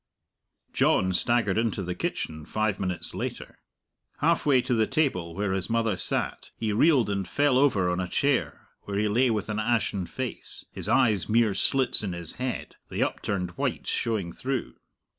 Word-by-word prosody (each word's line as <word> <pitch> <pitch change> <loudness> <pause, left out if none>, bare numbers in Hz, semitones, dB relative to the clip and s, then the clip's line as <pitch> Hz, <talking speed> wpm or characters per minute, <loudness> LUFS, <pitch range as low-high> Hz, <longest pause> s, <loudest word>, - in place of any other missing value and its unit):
John 95 0 +2
staggered 110 0 +1
into 115 -4 -1
the 90 0 -3
kitchen 80 -3 -4
five 110 +3 -1
minutes 90 -2 -3
later. - - -6 0.6
Halfway 150 -4 +3
to 130 0 0
the 110 -2 +2
table 90 - 0
where 100 0 -1
his 95 +2 -2
mother 115 -2 +1
sat - - +1
he 110 -2 -1
reeled 135 +1 +4
and 100 -2 -2
fell 145 +3 +2
over 125 -10 +3
on 90 0 0
a 90 - -2
chair, 140 +7 0 0.2
where 100 -1 -3
he 105 +1 +1
lay 120 +5 +3
with 110 -3 -1
an 105 0 -2
ashen 110 -5 0
face, 130 -3 -6
his - - -3
eyes 110 -7 +3
mere 110 -2 +3
slits 135 +5 +2
in 100 -4 -3
his 85 -2 -2
head, 130 -1 -4
the - - 0
upturned 95 -4 -2
whites - - -2
showing 100 -7 -1
through. 135 0 -3
110 Hz, 170 wpm, -27 LUFS, 95-125 Hz, 0.6 s, reeled